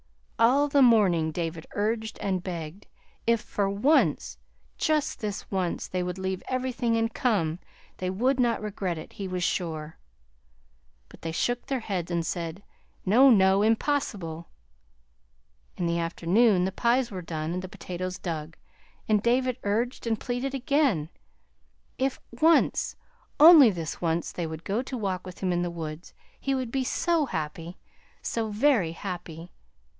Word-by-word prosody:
All 265 +6 +5
the 280 -1 +3
morning 195 -10 +4
David 165 0 -4
urged 220 +2 -1
and 190 -2 -1
begged. 170 +1 -6 0.4
If 230 0 +4
for 200 -1 -1
once, 240 +11 +2 0.4
just 305 -4 0
this 210 -4 -5
once, 185 -3 -1
they 185 - -2
would 180 0 -3
leave 190 0 -3
everything 250 -2 0
and 225 0 0
come, 180 -9 0 0.4
they 185 - -2
would 255 +8 +1
not 235 -3 +1
regret 195 -5 -3
it, 155 - -9
he 195 - -5
was 180 -1 -3
sure. 160 -4 -3 1.1
But - - -16
they 165 - -4
shook 245 +9 -1
their 265 -3 -1
heads 185 -6 -3
and 170 -2 -1
said, 170 +3 -4 0.4
"No, 245 +8 +6
no, 195 -3 +5
impossible!" 210 - 0 1.3
In 175 - -1
the 170 0 0
afternoon 180 +4 +2
the 190 - -1
pies 235 +4 +1
were 185 -2 -5
done 160 -1 -4
and 180 - -2
the 185 - -7
potatoes 185 -1 -5
dug, 165 -2 -5 0.5
and 215 -2 +3
David 250 +2 +1
urged 230 +4 -1
and 225 -2 0
pleaded 255 +2 -3
again. 260 - +1 0.9
If 265 0 0
once, 320 +8 +3 0.4
only 305 -5 +10
this 165 -6 -5
once, 170 0 -1
they 170 -2 -3
would 160 +1 -7
go 205 +5 -1
to 260 0 -5
walk 190 -4 -3
with 180 - -10
him 185 -2 +1
in 175 - 0
the 175 - -1
woods, 160 0 -7 0.2
he 275 0 -1
would 255 -3 -3
be 265 0 0
so 325 +3 +1
happy, 165 0 -5 0.5
so 225 -1 -2
very 210 - +2
happy! 170 -2 -7
195 Hz, 155 wpm, -27 LUFS, 170-245 Hz, 1.3 s, only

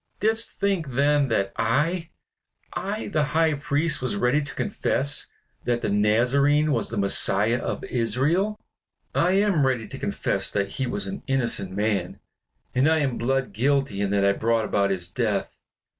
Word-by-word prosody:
Didst 220 +2 0
think 180 -10 -1
then 145 +1 +3
that 100 -5 0
I 150 +10 0 0.6
I 205 +4 -3
the 155 -6 +1
High 160 -1 +3
Priest, 145 +2 -1
was 130 -4 -2
ready 125 +7 +2
to 145 - -8
confess 145 -8 -1 0.4
that 120 -1 0
the - - 0
Nazarene 130 +9 +3
was - - 0
the 115 - -5
Messiah 100 +3 +3
of - - -4
Israel! 140 - 0 0.5
I 180 +2 +2
am 195 -6 +3
ready 125 -5 0
to - - -9
confess - - -1
that 100 -1 -1
he 130 +5 -3
was 200 +12 -2
an 195 0 -6
innocent 120 -8 0
man; 100 -2 -1 0.5
and 130 +5 +3
I 160 - +3
am 135 -4 -1
blood 130 -1 -1
guilty 135 -2 0
in 100 - 0
that 100 0 +2
I 100 - +5
brought 115 +2 0
about 100 -1 +1
his 90 -3 -2
death. 85 - -2
130 Hz, 165 wpm, -24 LUFS, 110-155 Hz, 0.6 s, I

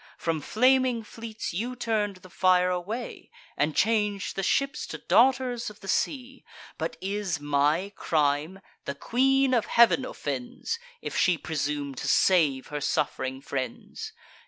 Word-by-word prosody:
From 165 -2 -1
flaming 255 - +3
fleets 225 -2 -6
you 235 +8 -3
turn'd 220 -4 -1
the 185 - -13
fire 185 -1 +3
away, 205 +7 -5 0.3
And 150 +1 0
chang'd 210 -3 +1
the 195 - -2
ships 275 +9 0
to - - -6
daughters 250 -1 +2
of 210 - -15
the 195 - -10
sea. 265 +5 -2 0.4
But - - -3
is 195 -4 -2
my 145 +7 +1
crime—the 150 +1 -1
Queen 265 - +2
of 235 -3 +2
Heav'n 235 +2 +5
offends, 145 - -4 0.2
If - - -4
she 180 -2 +3
presume 145 -3 -3
to 130 - -5
save 150 -8 +3
her 150 0 -4
suff'ring 130 -1 -1
friends! 130 -4 -5
195 Hz, 135 wpm, -27 LUFS, 150-235 Hz, 0.4 s, Heav'n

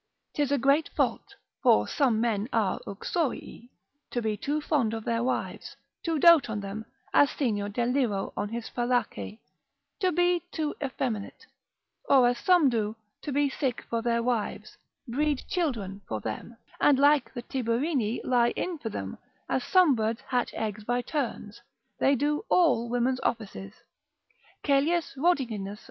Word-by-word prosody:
'Tis 290 -2 0
a 285 - +3
great 275 +5 +3
fault 405 - -1 0.3
(for - - +4
some 255 -8 +2
men 225 -1 0
are 215 -5 +1
uxorii) 245 - -3 0.4
to 245 - -2
be 220 -2 -1
too 290 +8 -2
fond 270 -8 0
of 225 - -6
their 230 0 0
wives, 260 - -3 0.3
to 330 -2 -1
dote 330 -4 +6
on 215 -1 -2
them 200 +2 -6 0.3
as 285 - +6
Senior 205 -7 -1
Deliro 240 -2 0
on 205 0 -2
his 230 0 -5
Fallace, 245 -3 -1 0.6
to 370 -3 +2
be 355 +1 +2
too 310 -2 -2
effeminate, 260 - -4 0.6
or 260 -3 +5
as 245 0 0
some 360 -5 +5
do, 220 -3 0 0.3
to 295 - -5
be 285 +1 +2
sick 265 -3 -2
for 230 -1 0
their 235 0 +1
wives, 235 -3 -2 0.3
breed 285 +3 0
children 225 - -2
for 110 - -3
them, 110 - -6 0.2
and 290 -2 +5
like 285 +1 +4
the 240 - -5
Tiberini 245 -1 -1
lie 240 -2 +3
in 355 -3 -3
for 225 - -4
them, 95 - -6 0.3
as 260 - 0
some 365 -6 +5
birds 225 -1 -1
hatch 250 -2 -1
eggs 215 -1 -3
by 245 +3 -1
turns, 240 -7 -4 0.4
they 275 - +4
do 295 - 0
all 260 -10 +3
women's 245 +2 +1
offices: 200 -4 -3 0.9
Caelius 300 +4 +2
Rhodiginus 275 -5 +1
ant. 200 -2 -4
lect. - - -5
Lib. - - -11
245 Hz, 160 wpm, -28 LUFS, 220-290 Hz, 0.9 s, dote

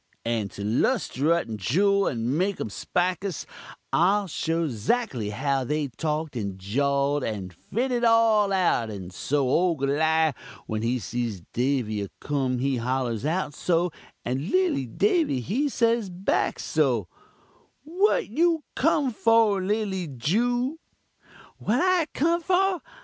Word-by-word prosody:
"And 115 -3 -1
to 100 - -6
'lusterut 140 +8 +1
the 110 -2 -5
juul 200 - +2
and 120 +1 -1
make 185 +4 0
um - - -3
spikus, 180 - -2 0.5
I'll 200 +4 +3
show 165 -1 -1
'zactly 125 - -1
how 135 +5 0
they 150 +2 -1
talk'd, 150 +3 -3
and 100 -5 -3
jaw'd, 140 +8 0
and 100 -5 -4
fit 240 - -3
it 240 -1 0
all 225 -3 +4
out; 175 - +2
and 95 -3 -7
so 140 +7 0
ole 170 +5 +2
Goliawh 155 +3 +2 0.3
when 110 0 -3
he 120 +3 0
sees 115 -6 -4
Davy 120 -5 0
a 100 - -5
kumun, 135 -3 -1
he 135 0 0
hollurs 120 -1 -1
out 160 -2 -1
so, 175 +2 0 0.3
and 135 +8 -2
lilly 355 - +1
Davy 330 - +1
he 245 - -1
say 230 -5 +1
back 180 +2 0
so: 130 - 0 0.8
"'What 360 +8 +1
you 325 +6 +1
kum 290 -2 +2
for, 225 -3 +3
lilly 195 -2 -1
Jew? 240 - 0 0.4
' - - -24
"'What 230 +5 +1
I 365 -2 +3
kum 335 +4 +2
for? 375 0 +1
160 Hz, 140 wpm, -25 LUFS, -, 0.8 s, all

